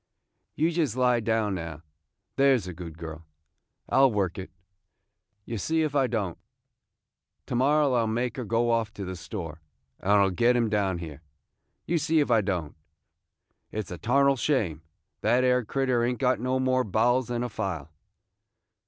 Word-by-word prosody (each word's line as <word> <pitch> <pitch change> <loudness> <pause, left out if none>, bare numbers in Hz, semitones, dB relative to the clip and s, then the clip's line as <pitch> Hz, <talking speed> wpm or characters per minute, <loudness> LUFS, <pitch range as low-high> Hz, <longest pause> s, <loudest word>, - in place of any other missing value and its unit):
"You 160 +3 +2
jest 160 -8 0
lie 125 -1 +3
down 110 -2 0
now, 80 -3 -6 0.5
there 135 -1 +5
's 105 - -6
a 90 - -6
good 85 -2 -9
girl, 80 -1 -8 0.6
and - - -2
I 135 - +6
'll 135 -2 +6
work 95 -4 -1
it, 95 - -7 0.5
– 100 -1 -51
ye 115 - -4
see 160 +9 0
if 150 -2 -1
I 135 -3 +3
don't. 105 -7 -2 1.1
To - - -6
morrow 140 +3 +3
I 120 - +3
'll 115 - 0
make 120 +2 -2
her 125 - -3
go 115 +2 +1
off 115 -2 0
to 100 - -5
the 95 0 -5
store, 85 -3 -7 0.4
and 100 - -1
I 100 -1 +6
'll 95 - +2
get 120 +7 +3
him 115 -2 +2
down 100 -3 0
here, 80 -4 -8 0.6
you 170 0 +1
see 160 +1 +2
if 145 -4 +1
I 115 -2 +5
don't. 90 -7 -3 1.0
It 110 -1 -3
's - - -12
a 90 - -6
tarnal 140 - +3
shame; 110 - 0 0.4
that 120 +4 +3
'ere 125 -1 +3
critter 130 0 0
ain't 125 +1 0
got 125 0 +1
no 130 +2 0
more 130 0 +2
bowels 120 +5 +2
than 120 0 -2
a 125 - -3
file." 90 -10 -4
115 Hz, 190 wpm, -27 LUFS, 95-130 Hz, 1.1 s, I